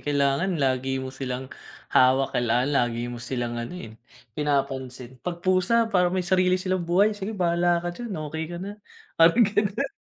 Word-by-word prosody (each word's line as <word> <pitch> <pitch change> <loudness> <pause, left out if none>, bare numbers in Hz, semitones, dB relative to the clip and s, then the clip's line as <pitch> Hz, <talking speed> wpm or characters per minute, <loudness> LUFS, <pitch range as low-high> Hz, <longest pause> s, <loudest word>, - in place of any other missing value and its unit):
Kailangan 145 +5 +1
lagi 135 -1 0
mo 130 0 -5
silang 130 -1 -5 0.4
hawak, 130 +1 +4
kailangan 120 +3 +1
lagi 120 -3 0
mo 120 - -7
silang 120 -1 -3
ano, 120 +10 -6
eh, 110 -10 -8 0.4
pinapansin. 130 -3 -3
'Pag 175 0 -6
pusa 185 +5 +3
parang 180 -1 +3
may 180 - 0
sarili 185 0 +3
silang 185 0 -1
buhay, 200 +5 +4
sige 205 +1 -5
bahala 175 -1 +1
ka 175 - -2
diyan, 220 -2 -6 0.2
okey 160 0 -3
ka 175 - -6
na, 195 +3 -6 0.5
parang 195 +8 +6
gano'n. 210 +6 0
165 Hz, 165 wpm, -25 LUFS, 130-185 Hz, 0.5 s, parang